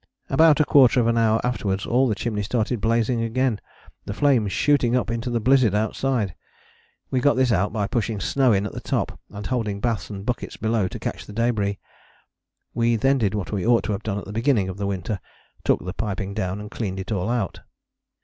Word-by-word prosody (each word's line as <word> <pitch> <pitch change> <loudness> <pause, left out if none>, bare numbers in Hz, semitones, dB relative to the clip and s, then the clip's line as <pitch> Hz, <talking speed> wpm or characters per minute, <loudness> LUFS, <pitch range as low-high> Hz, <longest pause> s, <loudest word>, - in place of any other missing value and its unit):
About 155 +2 +5
a 155 - +4
quarter 130 -3 +5
of 120 - +2
an 115 0 +2
hour 115 -1 +3
afterwards 100 -6 -1
all 130 +3 +2
the 110 - 0
chimney 105 -1 -2
started 115 +2 -1
blazing 115 +1 +1
again, 115 -1 0 0.4
the 100 - -5
flames 125 -8 +2
shooting 130 -3 +2
up 115 -3 0
into 115 +1 -3
the 120 -1 0
blizzard 125 -2 +3
outside. 110 -1 0 0.8
We 130 - +2
got 145 +3 +3
this 130 -1 +2
out 95 0 +1
by 105 -2 -1
pushing 110 0 -2
snow 130 +6 +2
in 100 -1 +2
at - - -4
the - - -6
top, - - -2
and 100 0 -8
holding 110 -6 -2
baths 115 0 -2
and 100 -1 -7
buckets 125 0 -3
below 110 -3 0
to - - -6
catch - - -5
the 105 - -9
débris. 105 -3 0 1.0
We 115 0 +2
then 135 +4 +2
did 105 -3 0
what 100 -3 -4
we 100 -4 -2
ought 120 0 +3
to - - -2
have 100 - -2
done 105 -2 -3
at 100 - -5
the 100 - -8
beginning 115 -4 +1
of 95 - -6
the 100 0 -2
winter 95 +1 -3 0.4
took - - +1
the 90 - -4
piping 100 -2 -3
down 95 -2 -2
and 105 +1 -8
cleaned 95 -4 -4
it 95 +2 -6
all 100 0 -1
out. 120 -6 -1
110 Hz, 215 wpm, -23 LUFS, 100-125 Hz, 1.0 s, About